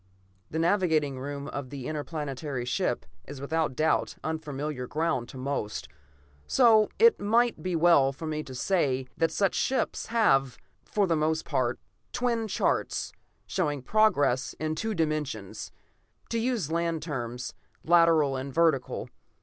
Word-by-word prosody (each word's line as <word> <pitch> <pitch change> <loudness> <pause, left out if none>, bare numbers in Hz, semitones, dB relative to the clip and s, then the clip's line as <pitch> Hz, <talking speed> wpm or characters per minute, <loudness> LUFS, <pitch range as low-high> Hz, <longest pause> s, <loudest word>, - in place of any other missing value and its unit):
The 160 - -4
navigating 160 -6 +2
room 140 +1 -5
of 135 -3 -6
an 140 - -6
interplanetary 145 -2 -4
ship 125 -10 -1 0.2
is 145 0 -8
without 150 0 -1
doubt 155 +3 +1
unfamiliar 150 -4 -4
ground 150 -6 -1
to - - -10
most, 130 -5 -3 0.6
so 225 -5 +5
it 465 +1 +6
might 235 +3 +2
be 180 -1 -2
well 160 -5 +5
for 140 +4 -8
me 155 -1 -2
to 130 - -9
say 135 -4 +1
that 165 -1 +2
such 195 -2 +1
ships 260 -3 -1
have, 135 - +2 0.3
for 205 -1 +1
the 170 -3 +1
most 155 +1 0
part, 120 -2 0 0.3
twin 235 -2 0
charts, 190 - -1 0.3
showing 150 -7 -1
progress 145 - +2
in 155 0 -1
two 220 +6 -2
dimensions; 150 - -3 0.6
to 230 - 0
use 225 - -1
land 165 -1 -1
terms, 125 -5 -4 0.3
lateral 165 -4 +4
and 135 +1 -4
vertical. 160 -6 +1
155 Hz, 140 wpm, -28 LUFS, 135-175 Hz, 0.6 s, it